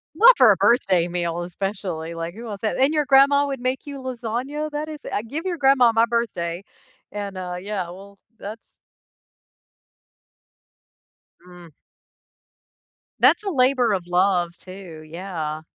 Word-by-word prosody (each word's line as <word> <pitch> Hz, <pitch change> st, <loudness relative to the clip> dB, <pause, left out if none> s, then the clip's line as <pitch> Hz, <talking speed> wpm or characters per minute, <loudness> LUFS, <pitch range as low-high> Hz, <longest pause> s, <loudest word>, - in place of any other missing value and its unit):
Not 485 Hz, +3 st, +7 dB
for 240 Hz, -5 st, +7 dB
a -, -, +4 dB
birthday 195 Hz, -5 st, +3 dB
meal, 175 Hz, -1 st, -3 dB
especially, 180 Hz, -3 st, -5 dB
like, 165 Hz, +1 st, -5 dB
who 230 Hz, +3 st, -9 dB
wants 205 Hz, -3 st, -7 dB
that? 215 Hz, -, -1 dB
And 270 Hz, +3 st, +3 dB
your 300 Hz, -2 st, +1 dB
grandma 280 Hz, +1 st, +5 dB
would 275 Hz, -2 st, -4 dB
make 255 Hz, +3 st, -2 dB
you 280 Hz, -1 st, -7 dB
lasagna? 260 Hz, +4 st, -4 dB
That 300 Hz, +1 st, -4 dB
is 305 Hz, -1 st, -9 dB
uh, 205 Hz, -, -2 dB
give 315 Hz, +8 st, -5 dB
your 350 Hz, -2 st, -2 dB
grandma 270 Hz, -4 st, +5 dB
my 225 Hz, +1 st, +4 dB
birthday, 195 Hz, -7 st, -2 dB, 0.5 s
and, 200 Hz, -2 st, -6 dB
uh, 180 Hz, -1 st, -5 dB
yeah. 200 Hz, -2 st, -3 dB
Well, 200 Hz, +2 st, -12 dB, 0.2 s
that's 215 Hz, +3 st, -10 dB, 2.7 s
Mm. 175 Hz, -1 st, -14 dB, 1.5 s
That's 450 Hz, -, +5 dB
a 395 Hz, -, -1 dB
labor 255 Hz, -, +2 dB
of 180 Hz, -3 st, -2 dB
love, 175 Hz, -1 st, +1 dB
too, 185 Hz, -4 st, -11 dB
yeah. 160 Hz, -3 st, -5 dB
205 Hz, 145 wpm, -23 LUFS, 180-265 Hz, 2.7 s, Not